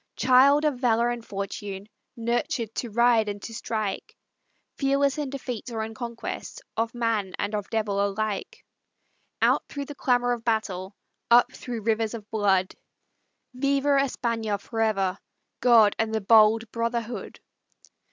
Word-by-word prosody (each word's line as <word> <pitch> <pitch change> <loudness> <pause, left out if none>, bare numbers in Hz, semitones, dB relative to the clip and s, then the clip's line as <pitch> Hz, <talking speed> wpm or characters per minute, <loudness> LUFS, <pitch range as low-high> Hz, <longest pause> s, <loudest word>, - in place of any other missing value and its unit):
Child 275 +4 +5
of 285 -5 0
valor 240 -1 +2
and 240 -1 -5
fortune, 200 -1 -6 0.3
Nurtured 235 0 -1
to 240 - -4
ride 230 -1 +3
and 205 0 -5
to 230 - -7
strike, 215 -3 -4 0.6
Fearless 275 +1 +1
in 290 -2 -2
defeat 250 -3 -5
or 225 -2 -3
in 220 0 -6
conquest, 235 - -6 0.2
Of 225 +1 -1
man 225 -5 -1
and 205 +1 -2
of 205 -1 -3
devil 205 -3 0
alike; 200 0 -3 0.8
Out - - +3
through 285 -1 -5
the 290 - -8
clamor 245 -3 +1
of 235 -2 -2
battle, 200 -4 -2 0.3
Up 240 +1 +5
through 240 -3 -6
rivers 225 +1 0
of 215 -2 -9
blood, 195 -4 +2 0.8
"Viva 275 +2 +1
España 235 -6 0
forever! 200 -4 -1 0.4
God 225 -4 +5
and 220 0 0
the - - +1
bold 220 +2 +5
Brotherhood! 230 0 -3
225 Hz, 140 wpm, -26 LUFS, 210-245 Hz, 0.8 s, Child